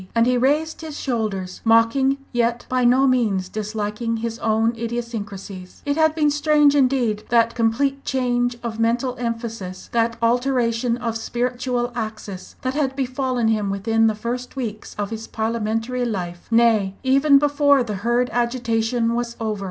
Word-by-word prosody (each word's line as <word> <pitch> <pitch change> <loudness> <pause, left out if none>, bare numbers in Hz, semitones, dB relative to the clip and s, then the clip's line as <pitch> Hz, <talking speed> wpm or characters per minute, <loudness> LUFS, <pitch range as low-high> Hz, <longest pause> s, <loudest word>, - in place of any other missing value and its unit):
And 230 0 +4
he 250 +1 +2
raised 295 +7 +1
his 310 -2 -7
shoulders, 210 -7 -3
mocking, 230 +4 +3 0.2
yet 235 0 0
by 255 0 0
no 255 +3 +5
means 215 -8 +1
disliking 215 +2 -3
his 230 0 -4
own 225 +1 +1
idiosyncrasies. 210 -5 -6
It 285 0 0
had 315 0 +3
been 300 -2 +2
strange, 295 -1 +4
indeed, 250 -6 +2
that 230 0 +3
complete 270 +4 0
change 245 -2 0
of 225 -1 -4
mental 240 +3 +1
emphasis, 230 -6 -5
that 230 0 +1
alteration 240 0 +1
of 235 -2 -3
spiritual 245 +1 -2
axis 215 -5 -6
that 255 0 -1
had 270 -2 -1
befallen 255 -3 0
him 210 -2 0
within 225 +3 +2
the 220 - +1
first 245 +4 -5
weeks 220 -5 -5
of 205 0 -3
his 225 0 -6
parliamentary 225 +2 -2
life, 180 -7 -4
nay, 225 -4 +3
even 275 +2 +5
before 285 -1 +3
the 210 -4 -4
Hurd 240 +2 +1
agitation 235 -1 0
was 235 0 -2
over. 215 -2 -2
235 Hz, 150 wpm, -22 LUFS, 225-255 Hz, 0.2 s, no